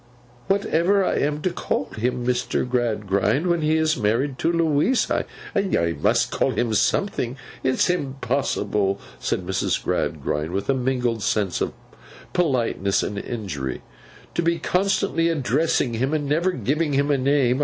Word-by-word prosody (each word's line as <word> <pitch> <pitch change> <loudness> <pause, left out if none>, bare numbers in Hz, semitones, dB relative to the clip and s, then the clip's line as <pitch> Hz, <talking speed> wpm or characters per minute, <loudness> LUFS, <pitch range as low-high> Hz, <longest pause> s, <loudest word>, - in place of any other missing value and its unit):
'Whatever 195 0 +2
I - - 0
am 150 +1 -1
to 185 - +1
call 95 - -2
him, 120 +2 -1
Mr. 125 0 0
Gradgrind, 115 - +1
when 175 -2 +1
he 155 +1 +2
is 160 0 +2
married 125 +6 0
to 165 - +2
Louisa! 165 - +1 0.3
I 200 - +4 0.4
must - - +2
call - - +1
him 120 -2 0
something. 125 - 0 0.3
It's 130 0 +2
impossible,' 130 - 0 0.2
said 90 - -2
Mrs. 95 +1 -1
Gradgrind, 75 +3 -1
with 100 +7 0
a - - +2
mingled 125 -3 0
sense 100 -4 0
of - - -1 0.6
politeness 120 - +1
and 100 - -3
injury, 95 - -4 0.5
'to - - 0
be 170 0 +1
constantly 180 -1 +1
addressing 150 -3 +1
him 130 +7 0
and 150 -2 -1
never 165 +6 +2
giving 150 - 0
him 140 +1 +2
a 140 - +3
name. 130 -1 +2
135 Hz, 145 wpm, -23 LUFS, 115-165 Hz, 0.6 s, I